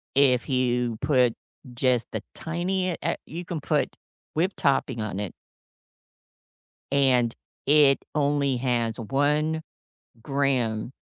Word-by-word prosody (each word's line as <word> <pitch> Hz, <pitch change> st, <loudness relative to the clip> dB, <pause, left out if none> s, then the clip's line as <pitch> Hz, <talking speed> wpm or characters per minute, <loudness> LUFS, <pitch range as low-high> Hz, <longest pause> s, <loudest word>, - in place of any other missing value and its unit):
if 130 Hz, -2 st, +3 dB
you 125 Hz, -3 st, +1 dB
put 125 Hz, -5 st, +3 dB, 0.4 s
just 125 Hz, -1 st, +2 dB
the 110 Hz, -, -3 dB
tinie 180 Hz, +2 st, -1 dB
eh, -, -, +1 dB
you 170 Hz, +3 st, -6 dB
can 165 Hz, -3 st, -4 dB
put -, -, 0 dB, 0.4 s
whipped 180 Hz, +5 st, 0 dB
topping 135 Hz, -4 st, +1 dB
on 105 Hz, -2 st, -3 dB
it 100 Hz, -4 st, -4 dB, 1.6 s
And 130 Hz, -4 st, +3 dB, 0.3 s
it 145 Hz, -1 st, +5 dB, 0.2 s
only 140 Hz, -2 st, +2 dB
has 120 Hz, -3 st, 0 dB
1 150 Hz, +6 st, +1 dB, 0.6 s
gram 130 Hz, -5 st, 0 dB
135 Hz, 110 wpm, -26 LUFS, 120-150 Hz, 1.6 s, it